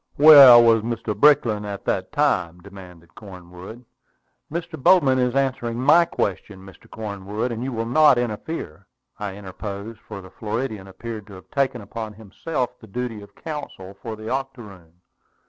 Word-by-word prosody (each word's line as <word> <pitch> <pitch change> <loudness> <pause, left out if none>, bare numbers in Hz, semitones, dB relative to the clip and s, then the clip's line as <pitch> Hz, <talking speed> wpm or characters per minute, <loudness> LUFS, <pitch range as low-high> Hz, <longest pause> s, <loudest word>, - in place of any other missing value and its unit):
"Where 140 -5 +10
was 115 -1 +4
Mr. 115 -1 -4
Brickland 115 -4 +3
at 100 -1 -7
that 95 -1 -2
time?" 90 - 0
demanded 90 -5 -14
Cornwood. 95 - -12 0.7
"Mr. 165 -2 -6
Bowman 135 -6 +4
is 125 0 0
answering 130 -4 -1
my 170 +6 +5
question, 95 - -4
Mr. 95 - -16
Cornwood, 105 +2 -5
and 115 +1 -5
you 135 - -4
will 115 -2 -3
not 145 +2 +4
interfere," 105 - -5 0.3
I 100 -2 -5
interposed, 100 +2 -8
for 105 -2 -10
the 95 - -14
Floridian 110 -2 -5
appeared 110 +2 -8
to 100 - -13
have 95 - -14
taken 135 -4 -1
upon 110 +1 -7
himself 120 +6 -4
the 110 - -15
duty 115 0 -5
of 100 - -16
counsel 145 - -8
for 115 -1 -6
the 110 0 -10
octoroon. 115 -11 -6
110 Hz, 155 wpm, -22 LUFS, 100-130 Hz, 0.7 s, Where